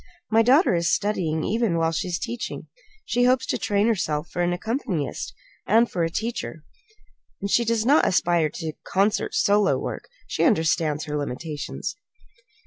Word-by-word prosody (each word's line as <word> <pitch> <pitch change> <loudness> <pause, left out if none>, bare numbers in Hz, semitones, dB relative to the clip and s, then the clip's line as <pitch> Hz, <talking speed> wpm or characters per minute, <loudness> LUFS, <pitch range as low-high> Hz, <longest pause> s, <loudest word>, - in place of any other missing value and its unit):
My 225 +1 +5
daughter 265 - +4
is 170 0 +1
studying 175 -7 0
even 220 -4 0
while 165 0 +1
she 165 - -2
is 175 -1 -1
teaching. 240 +1 -5 0.4
She 245 -12 +2
hopes 255 +1 +3
to - - -2
train 205 0 +1
herself 170 -8 -1
for 175 - -2
an 175 0 +1
accompanist, 185 - -3 0.4
and 230 +3 +4
for 175 - 0
a 165 - +1
teacher. 220 -5 -4 0.8
She 235 +4 +3
does 225 -1 0
not 285 +5 +5
aspire 175 -3 +2
to 160 0 -5
concert 200 +2 0
solo 205 -2 +3
work. - - -6 0.2
She - - -1
understands 160 - +2
her 150 -2 -4
limitations." 145 +2 -4
190 Hz, 155 wpm, -24 LUFS, 165-230 Hz, 0.8 s, My